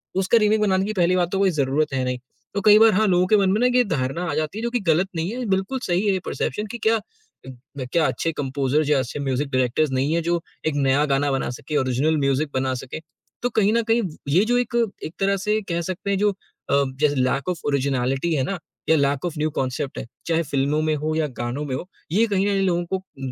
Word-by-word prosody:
उसका 190 +5 +3
रीमेक 215 0 +3
बनाने 190 -2 +2
की 215 - -2
पहली 180 -2 +2
बात 175 -1 +1
तो 195 - 0
कोई 195 -1 +4
ज़रूरत 145 -1 0
है 130 -1 0
नहीं। 125 0 -2 0.3
तो 200 - -1
कई 210 0 +8
बार 225 0 +7
हाँ, 215 +3 +3
लोगों 180 0 +3
के 215 +2 +5
मन 195 -1 +3
में 210 - +1
ना 250 - +5
ये 250 - +5
धारणा 150 - -2
आ - - -3
जाती 155 +6 -2
है 225 - -4
जो 235 - 0
कि 245 - 0
ग़लत 170 +4 +3
नहीं 165 +5 -2
है 250 0 -4
बिल्कुल 195 +7 0
सही 180 +3 0
है 200 - +3
ये 190 - 0
परसेप्शन 210 - -2
कि 235 - -5
क्या 225 - +5 0.5
उम, 130 - -8 0.2
ब 130 -2 -4
क्या 165 -2 +3
अच्छे 165 - -1
कम्पोज़र 140 +2 0
या 145 -3 +4
अच्छे 130 +3 -4
म्यूज़िक 135 +1 -1
डायरेक्टर 130 +4 +1
नहीं 135 +4 0
है 170 - +1
जो 170 +1 0 0.3
एक 155 - 0
नया 140 +1 +2
गाना 140 0 +1
बना 135 - -1
सके, 145 +4 -4
ओरिजनल 135 +4 +1
म्यूज़िक 140 +1 +1
बना 130 0 0
सके। 135 - -7 0.4
तो 245 - 0
कहीं 215 -1 +2
न 235 0 +2
कहीं 230 +1 +4 0.3
ये 175 +8 +4
जो 245 +1 +2
एक 245 -1 -1 0.3
एक 160 - -5
तरह 195 0 +2
से 210 +3 0
कह 170 0 0
सकते 185 +3 -4
हैं 195 - +1
जो 205 +1 +2 0.4
अ, - - +3 0.2
जैसे 150 -1 +2
लैक 135 +4 0
ऑफ 175 - -2
ओरिजिनैलिटी 135 +2 0
है 135 - +1
ना? 185 +8 -2 0.3
या 160 - +6
लैक 140 +1 +1
ऑफ़ 175 - -2
न्यू 155 +1 0
कॉन्सेप्ट 130 +1 -2
है, - - -4 0.2
चाहे 165 0 +1
फिल्मों 140 +1 0
में 155 0 +1
हो 155 0 0
या 160 -1 +1
गानों 120 +4 -3
में 135 - -4
हो, 175 - -6 0.2
ये 215 +6 +4
कहीं 200 -2 +1
न - - +2
कहीं 195 -1 +1
लोगों 175 -1 0
को 190 - -2
उम, 135 -9 -8
160 Hz, 255 wpm, -23 LUFS, 140-195 Hz, 0.5 s, कई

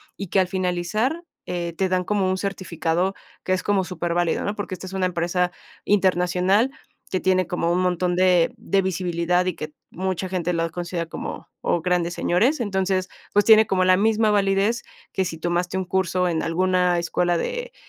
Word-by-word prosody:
y 200 - -6
que 195 - +3
al 185 - +3
finalizar, 185 - -1 0.2
eh, 170 -1 -3
te 190 -1 +1
dan 185 0 +1
como 200 -1 +1
un 185 0 -1
certificado 180 -2 -1 0.3
que 185 - 0
es 185 - 0
como 200 -2 +2
superválido, 175 -1 -1
¿no? 205 - -2
Porque, 205 -3 -5
esta 185 - -9
es 190 - -9
una 190 -1 0
empresa 180 0 0 0.3
internacional 190 +3 +2 0.4
que 185 - +1
tiene 185 0 +2
como 170 -1 0
un 175 - +2
montón 180 0 +1
de 180 +1 +4
de 200 -3 +1
visibilidad, 180 -1 0
y 185 - 0
que 155 0 -7 0.2
mucha 185 0 -2
gente 180 -1 -1
los 165 -1 -1
considera 175 0 -3
como, - - -6
o, 170 - 0
grandes 175 0 0
señores. 235 - +2
Entonces, 190 -4 0 0.2
pues, 205 -1 +4
tiene 220 -1 +7
como 185 -1 +2
la 185 0 +6
misma 215 +1 +3
validez 200 +3 +2 0.3
que 190 - +1
si 165 -2 -4
tomaste 175 +2 -1
un 190 - -2
curso 185 0 0
en 160 -2 0
alguna 180 +1 +2
escuela 175 0 0
de - - -4
185 Hz, 185 wpm, -23 LUFS, 175-195 Hz, 0.4 s, tiene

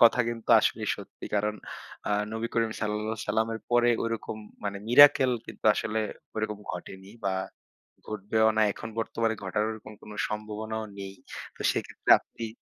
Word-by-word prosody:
কথা 120 +1 +7
কিন্তু 115 -1 -5
আসলেই - - 0
সত্যি। - - -11
কারণ 105 +1 +1 0.5
অ্যা - - -2 0.2
নবী 115 +1 -2
করিম 115 -1 +2
সাঃ 105 -1 0 0.6
এর 110 - -6
পরে 120 0 +5
ঐরকম 115 -1 -3 0.3
মানে 100 -1 -2
miracle 130 0 +8
কিন্তু - - -11
আসলে 110 0 -1 0.4
ওরকম 110 -1 -2
ঘটেনি 95 +2 -8 0.2
বা 95 - +1 0.7
ঘটবেও 110 +1 +1
না। 110 - +5
এখন 115 - -7
বর্তমানে 115 0 0
ঘটার 105 +3 0
ওরকম 110 -1 -8
কোন - - -11 0.2
সম্ভাবনাও 110 +1 -4
নেই। 95 0 -6 0.4
তো - - -6
সেক্ষেত্রে - - -3
আপনি 115 - -7
110 Hz, 150 wpm, -28 LUFS, 105-115 Hz, 0.7 s, miracle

